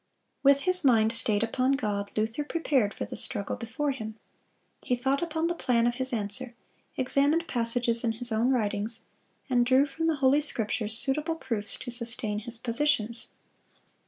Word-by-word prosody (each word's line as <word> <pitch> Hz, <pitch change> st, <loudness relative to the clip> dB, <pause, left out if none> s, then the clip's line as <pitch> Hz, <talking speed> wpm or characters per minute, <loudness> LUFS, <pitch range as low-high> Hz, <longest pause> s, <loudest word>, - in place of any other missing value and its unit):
With 280 Hz, 0 st, +4 dB
his 365 Hz, +1 st, +3 dB
mind 225 Hz, -4 st, +3 dB
stayed 215 Hz, -3 st, +1 dB
upon 255 Hz, +4 st, 0 dB
God, 205 Hz, -6 st, -2 dB
Luther 225 Hz, +7 st, -1 dB
prepared 285 Hz, -9 st, 0 dB
for -, -, -5 dB
the -, -, -8 dB
struggle 205 Hz, -5 st, -2 dB
before 240 Hz, +6 st, -3 dB
him. 220 Hz, -5 st, -7 dB, 0.7 s
He 250 Hz, -, -1 dB
thought 265 Hz, +3 st, -1 dB
upon 325 Hz, -1 st, -2 dB
the 345 Hz, -, 0 dB
plan 240 Hz, -8 st, +1 dB
of 240 Hz, -, +1 dB
his 260 Hz, -, -2 dB
answer, 235 Hz, +2 st, -2 dB, 0.4 s
examined 285 Hz, +6 st, +1 dB
passages 235 Hz, -1 st, +3 dB
in 230 Hz, -1 st, 0 dB
his 240 Hz, +1 st, -5 dB
own 225 Hz, +3 st, +1 dB
writings, 220 Hz, -2 st, 0 dB, 0.5 s
and 250 Hz, -3 st, +2 dB
drew 260 Hz, +3 st, +4 dB
from 320 Hz, +4 st, -3 dB
the 325 Hz, -, +1 dB
Holy 275 Hz, +1 st, +3 dB
Scriptures 220 Hz, -5 st, +3 dB
suitable 295 Hz, +5 st, -2 dB
proofs 220 Hz, -9 st, -4 dB
to 245 Hz, -, -7 dB
sustain 235 Hz, -3 st, -1 dB
his 230 Hz, +2 st, -1 dB
positions. 235 Hz, -1 st, 0 dB
245 Hz, 165 wpm, -27 LUFS, 225-280 Hz, 0.7 s, With